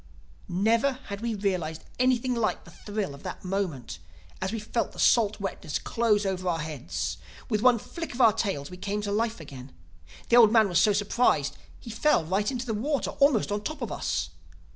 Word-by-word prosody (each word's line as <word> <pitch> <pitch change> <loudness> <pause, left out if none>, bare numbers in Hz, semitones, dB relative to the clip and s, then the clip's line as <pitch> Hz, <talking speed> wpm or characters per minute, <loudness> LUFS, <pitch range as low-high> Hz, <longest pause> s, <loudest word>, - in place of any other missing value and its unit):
"Never 225 +9 +2
had 220 -6 -8
we 230 -1 -1
realized 180 -6 -2 0.2
anything 255 0 +2
like 230 -2 -1
the - - -15
thrill 205 -6 -4
of 140 - -12
that - - -7
moment, 160 - -3 0.4
as 190 +1 -1
we 225 - -2
felt 225 +2 -2
the - - -11
salt 220 -3 +4
wetness 195 -6 -3
close 215 -3 +1
over 185 -1 -1
our 170 - 0
heads. 90 - -4 0.3
With 215 -2 +1
one 250 0 +5
flick 330 +5 -7
of - - -8
our 225 -4 +6
tails 185 -9 -2
we 180 - -8
came 205 +3 -3
to 205 - -2
life 225 +1 0
again. 135 -4 -10 0.6
The 235 - +6
old 225 -3 +8
man 220 -2 +5
was 175 - +3
so 210 - +5
surprised 200 - +2
that - - -20 0.2
he 230 - -8
fell 225 - +2
right 195 +5 0
into 255 -2 -3
the 225 - -2
water, 275 +7 -1
almost 275 -8 +4
on 205 0 -1
top 300 +3 -5
of 230 - -4
us. 85 -1 -2
205 Hz, 205 wpm, -27 LUFS, 170-235 Hz, 0.6 s, old